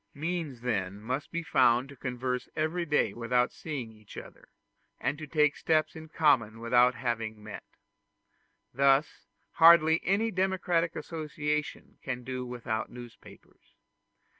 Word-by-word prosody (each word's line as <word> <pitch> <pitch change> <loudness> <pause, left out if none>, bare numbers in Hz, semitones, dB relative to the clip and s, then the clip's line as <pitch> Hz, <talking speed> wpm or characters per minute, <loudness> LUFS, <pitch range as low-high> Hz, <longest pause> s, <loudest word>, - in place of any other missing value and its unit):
Means 155 -4 -4
then 100 -5 -2
must 130 +7 -4
be 170 0 -3
found 125 -3 +3
to 140 - -11
converse 125 -1 -4
every 165 +3 -1
day 150 0 +1
without 125 +1 0
seeing 135 -8 -6
each 105 -2 -15
other, - - -11 0.5
and - - -1
to 155 - -7
take 150 -1 +2
steps 155 -1 0
in 160 0 -9
common 125 -9 +2
without 120 +2 +3
having 115 -3 -3
met. 110 - -11 1.0
Thus 140 +3 +2 0.2
hardly 165 -1 +6
any 210 +5 +1
democratic 180 -3 0
association 150 -2 -4
can 125 -2 -5
do 130 0 -5
without 120 -2 -4
newspapers. 120 -1 -14
135 Hz, 130 wpm, -29 LUFS, 120-160 Hz, 1.0 s, hardly